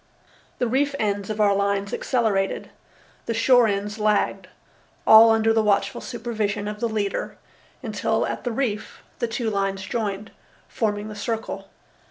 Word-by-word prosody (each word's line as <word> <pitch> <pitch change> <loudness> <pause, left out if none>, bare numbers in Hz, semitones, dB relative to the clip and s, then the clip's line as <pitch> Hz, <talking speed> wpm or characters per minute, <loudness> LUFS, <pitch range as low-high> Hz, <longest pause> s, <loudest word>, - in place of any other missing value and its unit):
The 250 - 0
reef 280 +4 +1
ends 205 -4 -1
of 215 0 -4
our 205 -1 +4
lines 200 0 0
accelerated, 215 -6 0 0.6
the 230 - -1
shore 245 0 +5
ends 205 +1 -2
lagged, 210 -1 +1 0.6
all 220 +1 +9
under 225 0 +3
the 225 - +3
watchful 200 -1 +1
supervision 220 -4 -3
of 210 0 -5
the 235 - 0
leader, 210 -2 -2 0.5
until - - 0
at - - -4
the 245 - -2
reef 225 -4 -3 0.2
the 235 - 0
two 225 0 -2
lines 195 -1 -1
joined, 205 0 -3 0.4
forming 210 -2 -2
the 215 - -8
circle. 225 +2 -4
215 Hz, 150 wpm, -24 LUFS, 200-230 Hz, 0.6 s, all